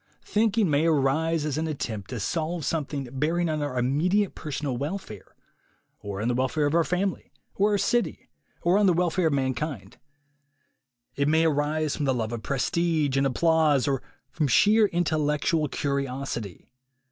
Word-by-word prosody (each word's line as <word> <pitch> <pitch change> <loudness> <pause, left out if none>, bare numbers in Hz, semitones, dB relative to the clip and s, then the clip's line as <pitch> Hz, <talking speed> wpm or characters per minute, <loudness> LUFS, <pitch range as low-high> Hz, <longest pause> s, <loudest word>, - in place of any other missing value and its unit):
Thinking 220 -1 +2
may 150 +1 +2
arise 155 +2 +1
as 150 0 -1
an 160 - -1
attempt 110 -10 -4
to 125 - -4
solve 160 - -2
something 145 -4 -2
bearing 165 +6 0
on 155 -1 -1
our 145 -3 -3
immediate 170 +11 +1
per 155 - -8
sonal 140 -2 -2
welfare, 145 - -6 0.6
or 100 -1 -6
on 110 - -1
the 125 - +1
welfare 130 +5 0
of 145 - 0
our 170 0 +4
family 185 +3 -2 0.2
or 205 +1 +2
our - - +3
city, 240 +4 0 0.4
or 180 +4 +3
on 205 - +4
the 180 - +5
welfare 175 0 +1
of 155 - 0
mankind; 130 -5 -3 1.2
it 140 0 +1
may 160 +2 +3
arise 150 0 0
from 145 - -2
the 135 -2 +1
love 110 -2 -2
of 120 -2 -4
prestige 150 +2 0
and 135 0 +3
applause 155 -1 +2
or 135 -2 0 0.3
from 145 +2 0
sheer 210 - +5
intellectual 155 -2 0
curiosity. 135 - -3
150 Hz, 165 wpm, -26 LUFS, 135-170 Hz, 1.2 s, the